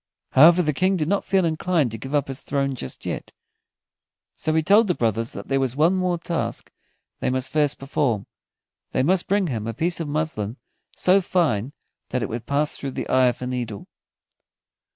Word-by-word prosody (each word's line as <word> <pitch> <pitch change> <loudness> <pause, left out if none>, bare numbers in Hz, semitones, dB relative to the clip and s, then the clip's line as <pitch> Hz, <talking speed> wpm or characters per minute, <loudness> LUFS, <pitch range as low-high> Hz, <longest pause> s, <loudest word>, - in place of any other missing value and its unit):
However, 170 +6 +7
the 150 -1 0
King 185 +7 +2
did 155 -3 -1
not 200 +3 +1
feel 190 -2 +2
inclined 160 -4 +1
to 115 - -5
give 135 +5 -4
up 145 -1 +1
his 135 -1 -6
throne 140 -1 -1
just 115 - -7
yet, - - -4 1.0
so 155 - -2
he 160 - +3
told 205 +6 +5
the 180 - +1
brothers 115 0 -1
that 100 - -8
there 135 0 +1
was 130 -2 -1
one 160 +5 +4
more 185 -2 0
task 170 -1 -4 0.5
they - - 0
must 130 0 -1
first 150 -1 +2
perform: 135 -6 -1 0.7
they 130 - +2
must 180 +5 +2
bring 200 0 +2
him 115 -8 -3
a 115 - -4
piece 170 +6 -1
of 165 - -3
muslin 145 -7 -2 0.4
so 190 +2 +4
fine 145 - 0 0.4
that 125 -2 -1
it - - -3
would 115 +1 -5
pass 145 +1 0
through 140 - -4
the - - -5
eye 130 -1 +4
of 125 +1 -1
a - - -2
needle. 120 -5 -4
145 Hz, 195 wpm, -23 LUFS, 125-170 Hz, 1.0 s, However